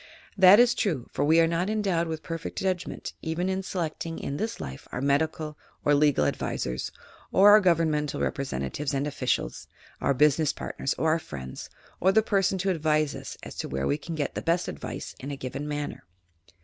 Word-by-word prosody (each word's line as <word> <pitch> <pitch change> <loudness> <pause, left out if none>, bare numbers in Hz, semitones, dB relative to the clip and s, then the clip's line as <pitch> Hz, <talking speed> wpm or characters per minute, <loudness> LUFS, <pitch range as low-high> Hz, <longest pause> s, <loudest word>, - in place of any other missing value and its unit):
"That 190 +1 +8
is 240 0 +6
true, 160 - -1
for 140 - -1
we 160 +3 +5
are 165 - +6
not 170 +4 0
endowed 195 -6 0
with 160 -1 -4
perfect 165 -1 -5
judgment 185 -2 -2
even 170 +3 -1
in 190 0 -1
selecting 165 -3 -4
in 140 - -4
this 225 +6 -3
life 65 0 -7
our - - -3
medical 150 +2 0 0.3
or 145 - +5
legal 145 - +4
ad - - +1
visors, 65 0 -3 0.4
or 200 +2 +7
our 210 +1 +8
governmental 160 -5 +1
representatives 135 - -2
and 135 +1 0
officials, 130 - -2 0.3
our 140 - +2
business 150 +2 +3
partners 135 - -3
or 160 - +2
our 165 - +2
friends, 65 - -8 0.3
or 190 - +4
the 220 +2 +4
person 195 -2 +1
to 190 +1 0
advise 155 -3 +1
us - - -7
as - - -7
to - - -4
where 65 0 -2
we 145 - 0
can 165 +2 -6
get 145 -3 -2
the - - -3
best 170 +1 +1
advice 75 - -6
in 135 - -6
a 140 - -4
given 135 +3 -5
matter. 145 0 -4
155 Hz, 195 wpm, -27 LUFS, 140-180 Hz, 0.4 s, That